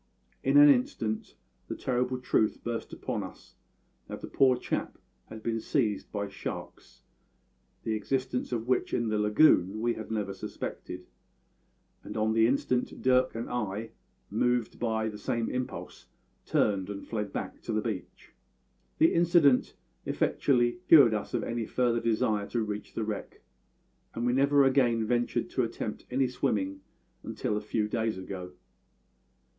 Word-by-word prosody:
In 135 +2 +4
an 145 0 +10
instant 120 -5 +1 0.3
the - - -4
terrible 125 0 -1
truth 110 -3 +1
burst 120 -1 -4
upon - - -3
us - - -10 0.5
that - - -7
the - - -6
poor 130 -2 +4
chap - - -3 0.3
had 110 0 -10
been 115 -1 -1
seized 105 -6 -1
by 100 -1 -2
sharks 100 - -8 0.8
the 110 - -1
existence 130 +4 -2
of 115 -1 -2
which 130 - +1
in 115 -1 0
the 110 -1 0
lagoon 105 - +4
we 120 +1 +1
had 110 - -7
never 105 -3 -2
suspected 90 -1 -6 1.0
and - - -7
on 110 0 +1
the 115 0 +5
instant 125 -1 0
Dirk 130 -1 +3
and 115 - -4
I, 110 -2 -3 0.4
moved 120 +1 0
by 110 -2 0
the 105 -1 -6
same 115 +2 -1
impulse, 125 0 -5 0.4
turned 100 -2 +1
and 100 -1 -6
fled 105 -3 -3
back - - -5
to - - -5
the 110 - +1
beach. 105 -5 -6 0.6
The 160 - +5
incident 170 -6 +4 0.3
effectually 120 +2 +1
cured 135 -8 +8
us 105 - -3
of - - 0
any 115 -1 -3
further 120 -2 +1
desire 110 -2 0
to 120 -2 -1
reach 105 -1 -6
the 115 - -1
wreck; 105 -2 -5 0.7
and 115 - -2
we 120 - +2
never 140 +2 +4
again 125 -4 +3
ventured 120 +1 0
to - - +1
attempt - - -5
any 130 +1 +1
swimming 95 -6 -1 0.4
until 105 - -3
a 105 - -1
few 105 0 -1
days 110 -1 -1
ago. 95 -1 -7
115 Hz, 150 wpm, -29 LUFS, 105-125 Hz, 1.0 s, an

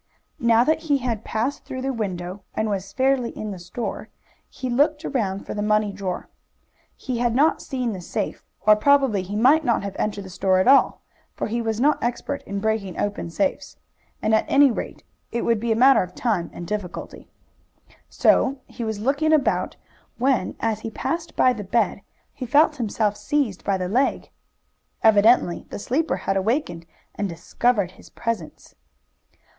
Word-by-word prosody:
Now 235 0 +4
that 315 +4 +2
he 285 - +4
had 235 -5 -3
passed 240 +6 -2
through 260 0 -6
the 270 0 -1
window, 190 -4 -4
and 215 -1 0
was 195 -1 -3
fairly 260 -2 +1
in 215 -1 -4
the 190 - -7
store, 180 +7 -5 0.4
he 260 - -6
looked 290 +5 +2
round 200 -9 -2
for - - -5
the 210 - -3
money 210 -1 +1
drawer. 190 -2 -4 0.7
He 250 -2 -4
had 240 -1 +1
not 300 +5 +3
seen 250 -5 -3
the 185 - -6
safe, - - -4 0.2
or 215 0 +7
probably 270 -3 +3
he 190 +3 -6
might 270 +9 +5
not 235 -7 +1
have 200 -1 -5
entered 205 -1 -2
the 190 - -10
store 185 +1 +2
at 185 - +2
all, 275 +1 +5 0.3
for - - -2
he 235 +2 -2
was 225 -1 -2
not 295 +4 +2
expert 245 +4 -2
in 200 0 -3
breaking 210 -4 -2
open 205 -4 -2
safes, 280 - -2 0.5
and 220 - +2
at 220 - +3
any 280 -1 +5
rate - - -6 0.3
it 235 - -2
would 230 -2 +2
be 230 +1 -1
a - - +3
matter 265 +4 +6
of 180 0 -6
time 205 -8 -1
and 175 - -8
difficulty. 205 -2 -6 0.8
So 275 +1 +3
he 240 - -7
was 220 -2 -2
looking 285 +7 +1
about 305 -3 +1 0.4
when, 260 +1 +1
as 225 -2 -1
he 225 - -5
passed 330 +9 -4
by 255 - +4
the 215 -3 -6
bed, 205 0 0 0.3
he 255 - -6
felt 295 +4 +4
himself 215 -3 0
seized 260 -7 -1
by 195 -1 +1
the 180 -1 -2
leg. 255 +8 0 0.7
Evidently 220 -4 +4
the - - -6
sleeper 290 +10 -1
had 195 - +1
awakened 195 - -1 0.3
and 200 - -3
discovered 185 +4 0
his 190 - -17
presence. 225 -9 -5
225 Hz, 180 wpm, -23 LUFS, 200-260 Hz, 0.8 s, or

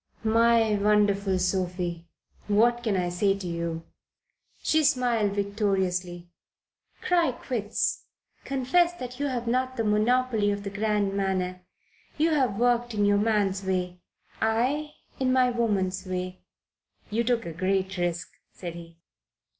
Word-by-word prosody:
"My 225 0 +4
wonderful 200 -2 +2
Sophie, 180 -2 -2 0.4
what 235 +4 +3
can 215 -5 0
I 180 -1 0
say 195 +3 +1
to 190 -2 -6
you?" 170 -1 -3 0.8
She 315 0 +3
smiled 245 -7 +2
victoriously. 190 -4 -1 0.8
"Cry 340 -7 +2
quits. 230 -4 -2 0.4
Confess 275 +7 +2
that 250 -6 -8
you 285 - 0
have 245 -3 -3
not 255 +2 -1
the 225 - 0
monopoly 220 +1 +2
of 200 0 -2
the 200 - -5
grand 205 -1 0
manner. 185 -2 -1 0.6
You 320 +2 +2
have 260 -9 +1
worked 240 0 +1
in 205 -1 +2
your 205 0 +3
man's 205 -3 +1
way 180 -1 -2 0.4
I 255 +7 0 0.2
in 260 -1 +1
my 255 -1 +3
woman's 195 -6 0
way." 185 0 -4 0.7
"You 230 +3 +1
took 235 -1 0
a 170 - -5
great 190 +2 -1
risk," 175 -1 -2 0.2
said 175 -2 -7
he. 170 -1 -11
205 Hz, 135 wpm, -27 LUFS, 185-240 Hz, 0.8 s, My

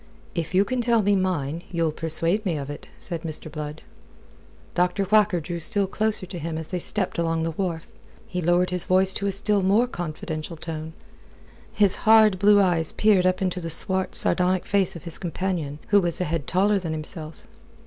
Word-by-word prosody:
"If 170 +1 -3
you 195 +2 +4
can 255 +1 -1
tell 235 -2 +2
me 205 +1 +3
mine, 170 -5 -1
you'll 165 -3 0
persuade 165 +6 0
me 175 -6 -1
of 140 0 -5
it," 145 - -10
said 170 -3 -6
Mr. 155 -1 -5
Blood. 150 0 -7 0.9
Dr. 180 +3 +1
Whacker 205 -2 +3
drew 170 +2 -5
still 200 +4 +1
closer 215 0 -1
to 180 -1 -7
him 160 0 -4
as 160 -1 -6
they 180 - -2
stepped 190 0 +3
along 165 -1 0
the 165 - -1
wharf. 165 -1 -3 0.4
He 180 -1 -4
lowered 175 +2 +2
his 180 -1 -2
voice 190 +1 +3
to 200 - -2
a - - +1
still 200 +1 +1
more 200 +6 +3
confidential 165 -5 -6
tone. 160 0 -6 0.8
His 205 -3 +2
hard 215 -3 +5
blue 205 +1 +6
eyes 175 -5 +2
peered 200 -4 +3
up 185 +1 0
into 180 -1 -2
the 165 - -5
swart, 190 +3 0
sardonic 180 0 +1
face 195 -3 +1
of 170 - -9
his 170 -2 -7
companion, 175 -5 -3
who 205 -1 +5
was 175 -2 -2
a - - 0
head 165 -3 -3
taller 200 +2 +2
than 165 -4 -4
himself. 155 0 -7
180 Hz, 195 wpm, -24 LUFS, 165-195 Hz, 0.9 s, blue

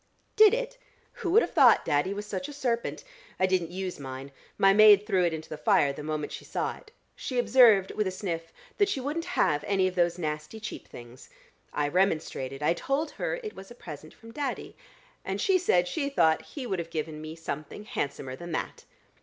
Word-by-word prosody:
"Did 430 0 +7
it? - - -5 0.4
Who 360 - -1
would 435 +7 +5
have - - -5
thought - - +6
Daddy 145 +6 +1
was 205 +1 -4
such 275 +7 -4
a - - -8
serpent? 240 -4 -2 0.4
I 185 - +4
didn't 185 -3 0
use 185 -1 -5
mine: 135 0 -7 0.3
my 195 0 +5
maid 210 -1 +7
threw 190 -4 +2
it 170 - +1
into 160 0 -6
the 155 - -7
fire 140 -1 +3
the 145 - -8
moment 150 0 -3
she - - -7
saw - - -3
it. - - -17 0.3
She 255 - -5
observed, 225 -4 +5
with 210 -2 -1
a - - +1
sniff, 170 -4 -5 0.3
that 405 -1 +4
she 280 - -1
wouldn't 300 +6 -3
have 145 -1 +2
any 190 -2 +2
of 185 - -3
those 175 -1 +1
nasty 155 +4 -4
cheap 215 - -7
things. 120 +1 -12 0.4
I 145 - 0
remonstrated: 150 -6 -1
I 160 - +3
told 275 - -2
her - - -3
it 430 - -6
was 195 - -11
a 240 - -12
present 155 -7 -10
from 230 0 -14
Daddy, 275 +1 -4 0.5
and - - -3
she 385 -3 +3
said 180 - +2
she 280 - -2
thought 160 - +3
he 275 -4 -8
would 190 -6 -2
have 165 -1 -5
given 155 -1 -4
me 155 +1 -7
something 160 +3 -6
handsomer 135 -8 -4
than 170 +4 -8
that." - - -4
185 Hz, 210 wpm, -28 LUFS, 155-245 Hz, 0.5 s, Did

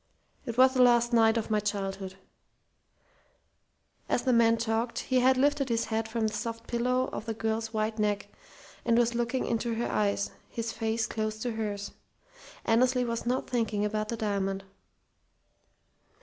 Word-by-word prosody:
It 235 0 -4
was 260 0 +6
the 255 - +3
last 240 -1 +4
night 225 0 +5
of 220 0 -3
my 215 - +3
childhood." 195 -2 -3 1.9
As 240 - +1
the 255 - +2
man 230 -1 +5
talked, 230 +1 -1
he 260 -1 +1
had 260 +1 +4
lifted 280 0 +2
his 230 -1 +1
head 220 0 -2
from 225 0 -1
the 215 - -1
soft 230 0 -4
pillow 250 +2 0
of 215 - -5
the 225 - -2
girl's 220 0 -2
white 220 0 -2
neck, 210 -1 0 0.6
and 230 - +3
was 240 0 +3
looking 240 +2 -1
into 230 0 -1
her 235 - -1
eyes, 200 -1 0 0.2
his 230 0 -3
face 225 0 -1
close 215 0 -3
to 245 - -1
hers. 205 -2 -4 0.7
Annesley 250 +2 +3
was 235 0 -3
not 255 +2 0
thinking 220 -4 0
about 215 0 -2
the 230 - -2
diamond. 195 -2 -1
230 Hz, 165 wpm, -29 LUFS, 215-240 Hz, 1.9 s, was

